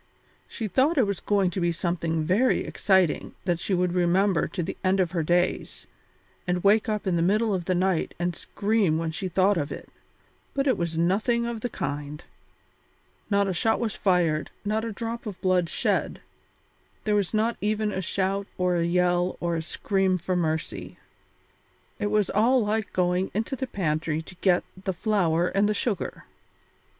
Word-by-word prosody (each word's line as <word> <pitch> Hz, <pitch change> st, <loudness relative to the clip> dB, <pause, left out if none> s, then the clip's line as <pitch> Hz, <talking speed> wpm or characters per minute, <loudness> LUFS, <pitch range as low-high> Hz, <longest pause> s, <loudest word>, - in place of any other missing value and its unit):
She 225 Hz, -, -4 dB
thought 275 Hz, -, +2 dB
it 255 Hz, -, +5 dB
was 200 Hz, -2 st, -2 dB
going 200 Hz, -3 st, +1 dB
to 185 Hz, -, -3 dB
be 170 Hz, 0 st, +2 dB
something 170 Hz, -1 st, -1 dB
very 200 Hz, +11 st, +2 dB
exciting 190 Hz, -5 st, +1 dB
that 175 Hz, -2 st, 0 dB
she 190 Hz, -, -1 dB
would 180 Hz, 0 st, +1 dB
remember 180 Hz, +1 st, +2 dB
to 180 Hz, -, -3 dB
the 185 Hz, -, -4 dB
end 190 Hz, +1 st, +2 dB
of 180 Hz, -3 st, +1 dB
her 175 Hz, -3 st, 0 dB
days, 175 Hz, +3 st, 0 dB, 0.6 s
and 180 Hz, 0 st, 0 dB
wake 210 Hz, +2 st, +4 dB
up 210 Hz, -1 st, -2 dB
in 180 Hz, -3 st, +1 dB
the -, -, +1 dB
middle 210 Hz, +5 st, +2 dB
of 180 Hz, -3 st, -2 dB
the 185 Hz, -, +1 dB
night 185 Hz, -1 st, 0 dB
and 175 Hz, 0 st, -1 dB
scream 205 Hz, -6 st, 0 dB
when 165 Hz, 0 st, -2 dB
she 185 Hz, +4 st, -4 dB
thought 190 Hz, +2 st, +3 dB
of 145 Hz, -1 st, -3 dB
it, -, -, -8 dB, 0.7 s
but 275 Hz, 0 st, +1 dB
it 265 Hz, -, +3 dB
was 170 Hz, -2 st, -3 dB
nothing 215 Hz, +8 st, +1 dB
of 235 Hz, -2 st, -4 dB
the 245 Hz, -, -2 dB
kind; 145 Hz, -1 st, -5 dB, 1.1 s
not 200 Hz, -1 st, +2 dB
a 190 Hz, -, 0 dB
shot 220 Hz, +6 st, +1 dB
was 225 Hz, -4 st, -1 dB
fired, 170 Hz, -5 st, +1 dB, 0.2 s
not 215 Hz, +2 st, 0 dB
a 230 Hz, -, -3 dB
drop 230 Hz, +2 st, -5 dB
of 200 Hz, -3 st, -6 dB
blood 180 Hz, -2 st, +2 dB
shed; -, -, 0 dB, 0.8 s
there 215 Hz, -, +1 dB
was 205 Hz, -3 st, +1 dB
not 225 Hz, +2 st, +1 dB
even 215 Hz, 0 st, 0 dB
a 190 Hz, -, -2 dB
shout 195 Hz, +2 st, -1 dB
or 180 Hz, -1 st, +1 dB
a 170 Hz, -, +1 dB
yell 180 Hz, +1 st, +1 dB
or 170 Hz, -1 st, -1 dB
a 165 Hz, -, -1 dB
scream 190 Hz, +3 st, 0 dB
for 185 Hz, +1 st, -2 dB
mercy. 155 Hz, -, -2 dB, 1.0 s
It 205 Hz, -, 0 dB
was 210 Hz, -1 st, +1 dB
all 230 Hz, +3 st, +3 dB
like 215 Hz, 0 st, -1 dB
going 180 Hz, +1 st, +1 dB
into 225 Hz, +6 st, -1 dB
the 265 Hz, 0 st, -4 dB
pantry 155 Hz, -5 st, -1 dB
to 160 Hz, -, -12 dB
get 180 Hz, -2 st, +3 dB, 0.2 s
the 190 Hz, -, -1 dB
flour 175 Hz, -4 st, +1 dB
and 200 Hz, +1 st, +2 dB
the 210 Hz, -, 0 dB
sugar. 205 Hz, -4 st, -2 dB
185 Hz, 185 wpm, -26 LUFS, 175-210 Hz, 1.1 s, it